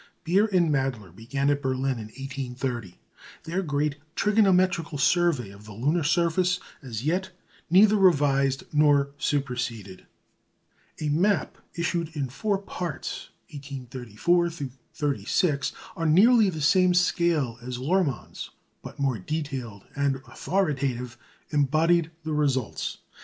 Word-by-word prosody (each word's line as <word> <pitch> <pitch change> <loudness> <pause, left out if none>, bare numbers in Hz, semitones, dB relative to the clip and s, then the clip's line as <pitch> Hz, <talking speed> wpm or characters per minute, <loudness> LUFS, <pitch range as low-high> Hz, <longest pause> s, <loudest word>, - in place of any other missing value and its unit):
Beer 195 +6 +3
and 180 -6 +2
Mädler 125 - -2
began 135 +6 -1
at 145 0 0
Berlin 130 -1 -1
in 110 - -6
1830 125 -4 -5 0.5
their 170 +4 -2
great 145 -3 -1 0.2
trigonometrical 185 -6 +2
survey 140 - +2
of 100 +1 -14
the 110 - -10
lunar 145 - +1
surface, 175 +3 +2 0.2
as 120 -3 -6
yet 185 +4 0 0.4
neither 200 +4 +6
revised 140 -7 +3
nor 145 -2 +4
superseded. 125 -10 -3 0.9
A 150 - -1
map, 175 +3 +1 0.2
issued 170 -1 -1
in 140 -3 -2
four 200 - -1
parts, 180 -5 -5 0.2
1834 135 - -1 0.5
36, 145 +1 0 0.2
on 160 -2 +2
nearly 220 +1 +6
the 160 -4 -5
same 180 +5 +4
scale 170 - +1
as 125 +1 -5
Lohrmann's, 145 - -1 0.3
but - - -10
more 135 -5 0
detailed 130 - -5
and 140 -1 +1
authoritative, 140 -9 -1 0.4
embodied 155 +3 +2
the 155 0 -3
results. 135 -6 -1
145 Hz, 115 wpm, -26 LUFS, 130-175 Hz, 0.9 s, neither